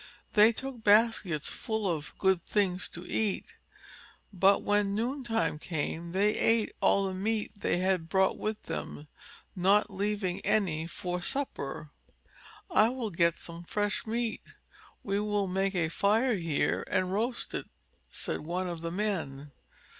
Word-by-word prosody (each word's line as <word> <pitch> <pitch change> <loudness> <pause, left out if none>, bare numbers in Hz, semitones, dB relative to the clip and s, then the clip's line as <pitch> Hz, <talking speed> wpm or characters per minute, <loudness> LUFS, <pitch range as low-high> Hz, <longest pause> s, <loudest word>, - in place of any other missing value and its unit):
They 215 +1 +7
took 250 0 -6
baskets 205 -7 +3
full 220 -2 -2
of 160 -4 -3
good 190 -3 +2
things 185 -3 0
to 170 +2 -6
eat. 215 -3 -1 0.8
But 195 +1 +4
when 205 -1 +2
noontime 230 - -1
came 165 +1 -3
they 200 +3 +3
ate 225 -1 +2
all 200 - +4
the 190 - -2
meat 210 +3 -1
they 200 - 0
had 180 -2 0
brought 190 +2 +3
with 215 0 -4
them, 150 - -6 0.5
not 200 +4 +3
leaving 200 -2 -1
any 165 -7 0
for 180 +1 -4
supper. 155 - -3 0.8
"I 220 -8 +5
will 245 -4 -3
get 170 -1 +2
some 170 0 -7
fresh 205 +4 -1
meat. 230 0 -1 0.6
We 200 0 0
will 205 -1 0
make 195 +1 0
a 170 -3 +2
fire 215 +9 +2
here 165 -5 0
and 185 0 0
roast 235 +4 -1
it," - - -4 0.4
said - - -3
one 180 +4 -3
of 170 -2 -5
the 170 - -3
men. 165 -8 -3
195 Hz, 145 wpm, -30 LUFS, 175-215 Hz, 0.8 s, They